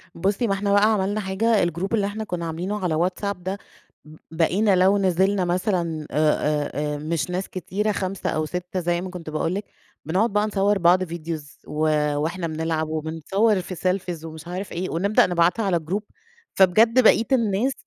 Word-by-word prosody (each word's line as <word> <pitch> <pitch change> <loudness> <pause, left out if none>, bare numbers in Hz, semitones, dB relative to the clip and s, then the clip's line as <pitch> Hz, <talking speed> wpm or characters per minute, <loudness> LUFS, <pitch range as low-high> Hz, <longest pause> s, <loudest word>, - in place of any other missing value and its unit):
بُصّي، 195 +7 0
ما 195 - +1
إحنا 200 +1 -1
بقى 210 +2 +5
عملنا 205 +1 0
حاجة، 205 +1 +1
الGroup 175 +5 -3
اللي 205 -3 +2
إحنا 215 +2 -4
كنا 180 -5 -4
عاملينه 175 +6 -3
على 170 -3 +1
WhatsApp 185 +4 -1
ده، 185 +2 -4 0.5
ب 155 0 -13 0.2
بقينا 185 +5 +2
لو 190 +2 +4
نزلنا 190 0 +2
مثلًا 175 -4 -1
آآ، 150 0 +3 0.3
آآ، - - -6 0.2
آآ، - - -4
مش 155 +3 -2
ناس 180 +2 -3
كتيرة، 195 +4 -2
5 190 -2 -3
أو 155 0 -1
6 180 +3 -4
زي 175 0 0
ما 185 - -5
كنت 180 -3 -8
باقول 155 +2 -1
لِك، 200 +1 -4 0.4
بنقعد 195 +8 +1
بقى 210 0 +2
نصور 205 0 +1
بعض 180 +1 +4
Videos 165 -4 -6
و 155 +1 0 0.3
وإحنا 170 +4 -2
بنلعب، 160 0 -2
وبنصور 165 +7 0
في 185 +1 -7
Selfies 180 -2 -2
ومش 160 0 -9
عارف 185 +3 -5
إيه، 180 +2 -3
ونبدأ 200 +6 +3
نبعتها 175 +5 +2
على 185 -3 +2
الGroup، 180 +7 -3 0.5
فبجد 225 +7 +5
بقية 225 +1 +5
الناس 230 +1 +2
185 Hz, 180 wpm, -23 LUFS, 165-200 Hz, 0.5 s, بقى